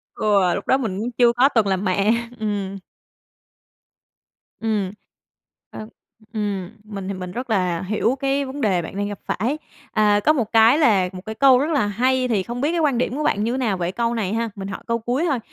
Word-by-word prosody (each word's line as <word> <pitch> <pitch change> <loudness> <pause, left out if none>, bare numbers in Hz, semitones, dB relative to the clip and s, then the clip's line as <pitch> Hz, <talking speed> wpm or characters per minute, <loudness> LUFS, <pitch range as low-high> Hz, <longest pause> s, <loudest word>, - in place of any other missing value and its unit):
Ừ, 200 -4 +2
lúc - - -6
đó 265 - +4
mình 215 -8 -3
cũng 235 +3 -3
chưa 240 0 +4
có 250 +3 +4
từng 225 -7 +2
làm 190 +1 0
mẹ, 195 +3 +2 0.3
ừm. 200 -2 -3 1.8
Ừm, 210 -4 -1 0.8
ờ, 215 - -8 0.5
ừm, 200 -4 -3
mình 200 -3 -7
thì 200 - -2
mình 180 -1 -6
rất 250 +5 -5
là 180 -5 0
hiểu 215 +6 0
cái 275 +1 0
vấn 270 +2 -6
đề 190 -6 +2
bạn 170 - -8
đang 205 0 -1
gặp 205 -1 -6
phải. 250 +10 -1 0.3
À, 210 -1 +3
có 305 - +6
một 235 -7 -2
cái 225 +4 +6
là 205 - +3
một 185 - -7
cái 220 0 -5
câu 260 0 +6
rất 300 +4 0
là 280 -9 +2
hay 255 +5 +1
thì 210 -6 0
không 240 +3 -5
biết 295 +3 +1
cái 340 - 0
quan 290 -6 +2
điểm 250 +1 -1
của 305 - -2
bạn 205 - +1
như 240 +3 -1
nào 220 -7 0
về 175 0 -2
câu 235 +4 -1
này 215 -4 -2
ha? 230 0 -1
Mình 195 -1 -6
hỏi - - -7
câu 230 0 0
cuối 245 +8 -1
thôi, 270 - 0
220 Hz, 220 wpm, -22 LUFS, 195-250 Hz, 1.8 s, có